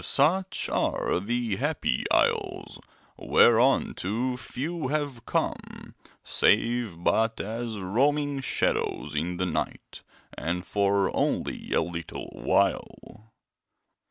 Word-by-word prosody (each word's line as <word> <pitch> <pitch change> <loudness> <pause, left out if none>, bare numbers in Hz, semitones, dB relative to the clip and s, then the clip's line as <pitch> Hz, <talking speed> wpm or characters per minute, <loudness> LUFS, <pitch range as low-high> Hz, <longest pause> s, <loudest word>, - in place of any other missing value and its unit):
Such 180 +7 +2
are - - 0
the 115 0 -1
Happy 145 - -1
Isles, - - 0 0.4
whereunto 120 -1 +3
few 150 +5 -4
have 145 -4 -3
come, - - -3 0.3
save 110 -5 +1
but 115 +3 +2
as 115 +1 -4
roaming 140 +9 +1
shadows 75 - -1
in 85 +4 -2
the 90 - 0
night, 90 - -4 0.3
and 90 +2 -3
for 100 0 +1
only - - -1
a - - +3
little 85 -1 -6
while. 110 +1 -1
115 Hz, 100 wpm, -27 LUFS, 95-135 Hz, 0.4 s, whereunto